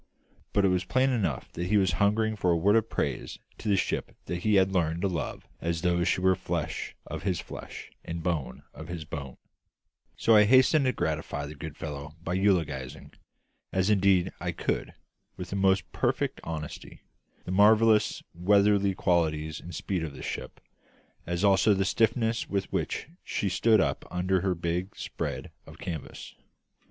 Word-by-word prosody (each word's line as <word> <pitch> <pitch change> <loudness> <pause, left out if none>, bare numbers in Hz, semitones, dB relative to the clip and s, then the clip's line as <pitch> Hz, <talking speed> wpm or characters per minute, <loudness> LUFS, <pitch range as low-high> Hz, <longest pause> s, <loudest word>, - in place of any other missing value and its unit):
But 100 - +3
it - - +4
was 90 0 +1
plain 130 +7 +2
enough 95 - -1
that 85 +1 -4
he 105 +3 +3
was 95 -3 +3
hungering 110 +2 +2
for 90 -3 0
a 85 - +4
word 100 +6 +3
of 115 0 +2
praise - - -2 0.2
to 110 - -3
the 100 - +4
ship - - -2
that 90 - -3
he 105 +3 +2
had 95 0 +4
learned 85 -1 0
to - - +3
love 85 -5 -4
as 85 0 -2
though 85 -1 +2
she 85 - +1
were 95 0 +5
flesh - - -4
of - - -6
his 95 -4 -1
flesh - - -9
and 85 0 -5
bone 80 -6 -2
of 80 - -9
his 85 -2 -6
bone: 70 -4 -7 0.8
so 115 - +4
I 105 0 +7
hastened 130 +5 +5
to 130 - +3
gratify 70 -11 -2
the 75 - -7
good 75 0 -8
fellow 75 0 -6
by 85 - -2
eulogising 80 -10 0 0.6
as 95 +2 +2
indeed 95 -2 +3
I - - -2
could - - -2 0.4
with 90 - -7
the - - -2
most 95 -2 +2
perfect - - -1
honesty 80 -2 -7 0.4
the 90 - -4
marvellous 110 +2 +4
weatherly 100 +2 +3
qualities 80 -3 0
and 85 -1 -9
speed 90 -1 -2
of 80 -3 -5
the - - -9
ship, - - -5 0.7
as 85 +2 -2
also 100 +1 +5
the 95 0 +1
stiffness 115 +2 +1
with 100 -1 -2
which - - -2 0.2
she 100 - -1
stood 110 +4 +4
up - - 0
under 90 +2 0
her 95 -1 0
big 85 +4 -3
spread - - -5 0.2
of - - -12
canvas. 80 -5 -7
95 Hz, 175 wpm, -28 LUFS, 85-100 Hz, 0.8 s, I